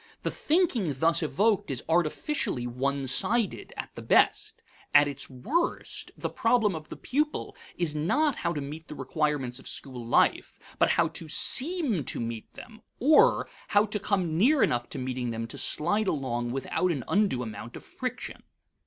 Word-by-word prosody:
The -, -, -1 dB
thinking 270 Hz, -, +1 dB
thus 165 Hz, +5 st, +3 dB
evoked 205 Hz, +5 st, +1 dB
is 130 Hz, -3 st, -3 dB
artificially 165 Hz, -, 0 dB
one 135 Hz, +3 st, -2 dB
sided 210 Hz, -, 0 dB
at -, -, -6 dB
the -, -, -8 dB
best. -, -, +2 dB, 0.3 s
At 145 Hz, 0 st, +7 dB
its 140 Hz, -1 st, -3 dB
worst, 260 Hz, -, -2 dB
the -, -, -3 dB
problem 220 Hz, -7 st, +1 dB
of 155 Hz, -1 st, -8 dB
the -, -, -7 dB
pupil 300 Hz, +3 st, -2 dB, 0.2 s
is 170 Hz, -4 st, 0 dB
not 255 Hz, -, +1 dB
how 170 Hz, -, -1 dB
to 150 Hz, -, -3 dB
meet 150 Hz, +4 st, -8 dB
the 150 Hz, -, -8 dB
requirements 135 Hz, -2 st, -1 dB
of -, -, -10 dB
school 130 Hz, -3 st, -5 dB
life, 115 Hz, -, +1 dB, 0.2 s
but -, -, +4 dB
how -, -, +3 dB
to 165 Hz, -, -7 dB
seem 270 Hz, -, +3 dB
to -, -, -2 dB
meet 115 Hz, -1 st, -5 dB
them 220 Hz, -2 st, -12 dB, 0.2 s
or, 300 Hz, +5 st, +5 dB, 0.2 s
how 205 Hz, 0 st, +4 dB
to 210 Hz, 0 st, -3 dB
come 185 Hz, -6 st, 0 dB
near 270 Hz, +8 st, +4 dB
enough 120 Hz, -1 st, 0 dB
to -, -, -6 dB
meeting 125 Hz, -1 st, -3 dB
them 115 Hz, 0 st, -3 dB
to 115 Hz, -, -7 dB
slide 205 Hz, +7 st, +2 dB
along 120 Hz, -7 st, -1 dB
without 135 Hz, +8 st, -1 dB
an 140 Hz, -7 st, -3 dB
undue 190 Hz, -11 st, +1 dB
amount 110 Hz, +1 st, -8 dB
of -, -, -9 dB
friction. 250 Hz, -1 st, -6 dB
160 Hz, 170 wpm, -28 LUFS, 130-215 Hz, 0.3 s, At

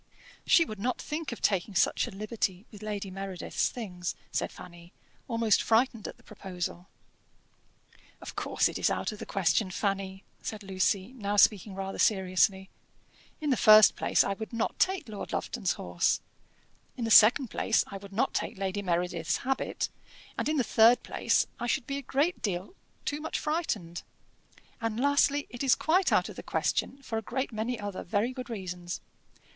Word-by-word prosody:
"She 335 Hz, -, +6 dB
would 215 Hz, -7 st, -8 dB
not 250 Hz, +4 st, -1 dB
think 305 Hz, -1 st, -4 dB
of 235 Hz, -, -8 dB
taking 195 Hz, 0 st, +1 dB
such -, -, +2 dB
a -, -, -5 dB
liberty 205 Hz, -1 st, -3 dB
with 210 Hz, -2 st, -12 dB
Lady 205 Hz, -2 st, -4 dB
Meredith's 195 Hz, -1 st, -2 dB
things," 180 Hz, -7 st, -5 dB, 0.2 s
said -, -, -1 dB
Fanny, 175 Hz, 0 st, -13 dB, 0.3 s
almost 230 Hz, -3 st, +2 dB
frightened 230 Hz, -1 st, +2 dB
at -, -, -8 dB
the -, -, -23 dB
proposal. 185 Hz, -3 st, -6 dB, 1.3 s
"Of -, -, -9 dB
course -, -, +1 dB
it -, -, -4 dB
is -, -, +3 dB
out -, -, -1 dB
of 210 Hz, -, -9 dB
the -, -, -7 dB
question, 195 Hz, +1 st, +1 dB
Fanny," 195 Hz, 0 st, -2 dB, 0.2 s
said 215 Hz, -1 st, -5 dB
Lucy, 190 Hz, +3 st, 0 dB
now 205 Hz, -5 st, -2 dB
speaking 205 Hz, -1 st, +4 dB
rather 195 Hz, 0 st, -5 dB
seriously. 190 Hz, -1 st, +2 dB, 0.7 s
"In 300 Hz, -3 st, -1 dB
the -, -, +4 dB
first 215 Hz, -2 st, +8 dB
place, -, -, +3 dB
I 200 Hz, -, -1 dB
would 215 Hz, +2 st, -7 dB
not 230 Hz, -1 st, -2 dB
take 380 Hz, -5 st, +1 dB
Lord 210 Hz, -2 st, -7 dB
Lufton's 215 Hz, -7 st, -1 dB
horse; 85 Hz, -1 st, 0 dB, 0.8 s
in 240 Hz, -, -2 dB
the 225 Hz, -, -2 dB
second 230 Hz, +4 st, +7 dB
place, 225 Hz, -, +2 dB
I 200 Hz, -, -7 dB
would 200 Hz, 0 st, -12 dB
not 235 Hz, +7 st, 0 dB
take -, -, -2 dB
Lady 195 Hz, +1 st, -2 dB
Meredith's 170 Hz, -4 st, 0 dB
habit; 270 Hz, 0 st, -1 dB, 0.5 s
in 305 Hz, 0 st, 0 dB
the 260 Hz, -, +3 dB
third 230 Hz, +2 st, +5 dB
place, -, -, +1 dB
I 240 Hz, -, -2 dB
should 240 Hz, +1 st, 0 dB
be 275 Hz, -, -3 dB
a -, -, -4 dB
great 285 Hz, +7 st, 0 dB
deal 185 Hz, -, -3 dB, 0.3 s
too 295 Hz, +1 st, -2 dB
much 315 Hz, -, -3 dB
frightened; 220 Hz, -, -2 dB, 0.8 s
and, 225 Hz, 0 st, -2 dB
lastly, 285 Hz, +1 st, +3 dB
it 245 Hz, -, -7 dB
is 270 Hz, -2 st, +4 dB
quite 360 Hz, +4 st, +2 dB
out -, -, +3 dB
of -, -, -10 dB
the -, -, -5 dB
question 270 Hz, -, -1 dB
for 225 Hz, -3 st, -2 dB
a -, -, -7 dB
great 260 Hz, +5 st, -3 dB
many 225 Hz, +2 st, -2 dB
other 205 Hz, -2 st, -5 dB
very 215 Hz, +7 st, -1 dB
good 255 Hz, -1 st, -7 dB
reasons." 180 Hz, -5 st, -5 dB
215 Hz, 175 wpm, -29 LUFS, 190-245 Hz, 1.3 s, first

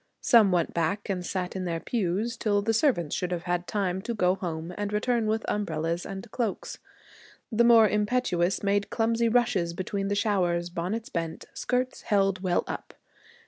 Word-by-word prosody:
Some 230 Hz, -8 st, +5 dB
went 175 Hz, -2 st, +1 dB
back 170 Hz, +6 st, -1 dB
and 185 Hz, -2 st, -1 dB
sat 180 Hz, 0 st, -3 dB
in 185 Hz, -1 st, -3 dB
their 165 Hz, -2 st, -2 dB
pews 215 Hz, +3 st, -1 dB
till 205 Hz, -2 st, +1 dB
the 225 Hz, +2 st, +1 dB
servants 220 Hz, -, +1 dB
should 180 Hz, -, -2 dB
have 175 Hz, -1 st, -2 dB
had 175 Hz, 0 st, -2 dB
time 190 Hz, -3 st, -1 dB
to 235 Hz, +3 st, -4 dB
go 180 Hz, -3 st, +3 dB
home 170 Hz, -2 st, -5 dB
and 205 Hz, 0 st, -3 dB
return 225 Hz, +2 st, +1 dB
with 220 Hz, +1 st, 0 dB
umbrellas 170 Hz, -4 st, -2 dB
and 195 Hz, +3 st, -7 dB
cloaks. 230 Hz, -6 st, -3 dB, 0.7 s
The 230 Hz, +1 st, +3 dB
more 230 Hz, -2 st, +7 dB
impetuous 205 Hz, -4 st, 0 dB
made 200 Hz, 0 st, +1 dB
clumsy 230 Hz, 0 st, +1 dB
rushes 225 Hz, -8 st, +1 dB
between 195 Hz, +2 st, -3 dB
the 205 Hz, -, 0 dB
showers, 180 Hz, -5 st, 0 dB
bonnets 185 Hz, +7 st, -3 dB
bent, 165 Hz, -1 st, -4 dB
skirts 250 Hz, +1 st, -2 dB
held 195 Hz, -3 st, +1 dB
well 180 Hz, -2 st, +1 dB
up. -, -, -7 dB
200 Hz, 175 wpm, -27 LUFS, 175-225 Hz, 0.7 s, more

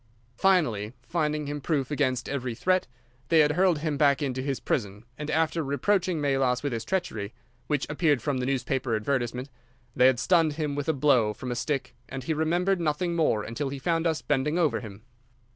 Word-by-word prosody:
Finally, 120 Hz, -, +2 dB
finding 150 Hz, -3 st, -1 dB
him 145 Hz, 0 st, -4 dB
proof 140 Hz, -2 st, -1 dB
against 130 Hz, -4 st, 0 dB
every 130 Hz, -4 st, -3 dB
threat, 185 Hz, +8 st, +1 dB, 0.4 s
they 160 Hz, -1 st, +6 dB
had 150 Hz, 0 st, +4 dB
hurled 180 Hz, +1 st, +3 dB
him 150 Hz, -1 st, -2 dB
back 140 Hz, -1 st, +4 dB
into 130 Hz, -3 st, -2 dB
his 135 Hz, -2 st, -2 dB
prison, 105 Hz, -3 st, -2 dB
and 150 Hz, +2 st, -6 dB
after 160 Hz, +1 st, +1 dB
reproaching 175 Hz, +5 st, 0 dB
Melas 135 Hz, -3 st, +1 dB
with 140 Hz, -3 st, -1 dB
his 115 Hz, -1 st, -3 dB
treachery, 115 Hz, -, -3 dB, 0.3 s
which 145 Hz, -3 st, 0 dB
appeared 150 Hz, -2 st, +2 dB
from 135 Hz, +2 st, -1 dB
the 125 Hz, -, -2 dB
newspaper 130 Hz, -2 st, -1 dB
advertisement, 125 Hz, +3 st, -2 dB, 0.4 s
they 125 Hz, +1 st, +6 dB
had 130 Hz, -2 st, +4 dB
stunned 165 Hz, +1 st, +3 dB
him 150 Hz, -1 st, -2 dB
with 145 Hz, +2 st, -3 dB
a -, -, +3 dB
blow 130 Hz, -7 st, +3 dB
from 125 Hz, -2 st, -5 dB
a -, -, -2 dB
stick, 135 Hz, +1 st, -2 dB, 0.2 s
and 135 Hz, -1 st, -6 dB
he 160 Hz, -, -1 dB
remembered 175 Hz, +4 st, +1 dB
nothing 170 Hz, +2 st, 0 dB
more 150 Hz, -10 st, +2 dB
until 135 Hz, +6 st, -3 dB
he 140 Hz, -, -5 dB
found 165 Hz, +4 st, 0 dB
us 160 Hz, -1 st, -1 dB
bending 150 Hz, +3 st, 0 dB
over 165 Hz, -5 st, +2 dB
him. 105 Hz, -2 st, -10 dB
145 Hz, 195 wpm, -27 LUFS, 130-160 Hz, 0.4 s, they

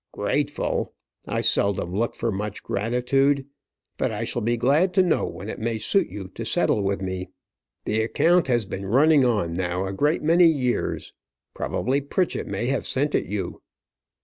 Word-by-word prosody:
"Grateful! -, -, -1 dB, 0.3 s
I -, -, -1 dB
seldom 95 Hz, -3 st, +1 dB
look 115 Hz, +3 st, -1 dB
for 115 Hz, -, -1 dB
much 105 Hz, +1 st, -4 dB
gratitude. 135 Hz, +5 st, +1 dB, 0.5 s
But -, -, 0 dB
I -, -, -3 dB
shall -, -, -2 dB
be 120 Hz, +2 st, 0 dB
glad 150 Hz, +10 st, +2 dB
to 190 Hz, -, +6 dB
know 175 Hz, -, +1 dB
when 100 Hz, -, -8 dB
it -, -, -6 dB
may 115 Hz, 0 st, -1 dB
suit 195 Hz, -, +2 dB
you 100 Hz, -2 st, -7 dB
to -, -, -7 dB
settle 105 Hz, -, +1 dB
with 100 Hz, 0 st, -1 dB
me. 95 Hz, 0 st, -4 dB, 0.6 s
The 110 Hz, +1 st, +1 dB
account 170 Hz, +10 st, +2 dB
has 120 Hz, -4 st, +1 dB
been 95 Hz, 0 st, -6 dB
running 145 Hz, +6 st, +5 dB
on 105 Hz, -9 st, 0 dB
now 90 Hz, +1 st, -1 dB
for 95 Hz, -, -3 dB
a -, -, -4 dB
great 150 Hz, -, +1 dB
many 170 Hz, +3 st, +5 dB
years. 130 Hz, -6 st, -1 dB, 0.4 s
Probably 135 Hz, +3 st, -1 dB
Pritchett 170 Hz, +5 st, -1 dB
may 120 Hz, -, -3 dB
have 135 Hz, +2 st, -1 dB
sent 145 Hz, +2 st, 0 dB
it -, -, +1 dB
you." 95 Hz, -2 st, -4 dB
120 Hz, 175 wpm, -24 LUFS, 100-145 Hz, 0.6 s, to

